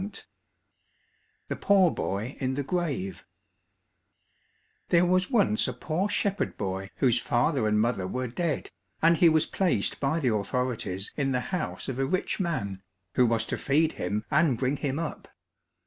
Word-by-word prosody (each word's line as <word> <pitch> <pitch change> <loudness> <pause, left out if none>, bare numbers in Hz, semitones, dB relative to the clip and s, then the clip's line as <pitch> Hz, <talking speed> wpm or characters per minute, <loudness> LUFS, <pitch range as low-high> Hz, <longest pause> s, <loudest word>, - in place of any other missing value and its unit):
185 200 +1 -8 1.2
The - - -1
Poor 190 -4 +5
Boy 105 +7 -3
in 130 -1 -1
the 145 - -1
Grave 140 - -2 1.7
There 175 0 +5
was 185 +1 +2
once 205 - +2
a - - -2
poor 175 +6 -2
shepherd 200 -1 0
boy 95 -1 -3
whose 125 -2 +3
father 120 0 +1
and 105 0 +2
mother 110 -5 0
were 125 +6 -2
dead, 155 +5 -2 0.3
and 165 0 +5
he 170 -1 +6
was 155 -1 +3
placed 175 - 0
by 140 +4 +1
the 125 -7 +1
authorities 105 -3 -2
in 135 -2 0
the 125 - +1
house 180 - -2
of 130 -1 -4
a 135 - +2
rich 185 +5 -1
man, 100 - -2 0.3
who 125 - +4
was 115 0 +1
to - - -4
feed 155 +3 +2
him 105 +1 -3
and 150 -4 +3
bring 130 +3 0
him 140 0 -2
up. 165 -1 -5
135 Hz, 165 wpm, -27 LUFS, 115-170 Hz, 1.7 s, he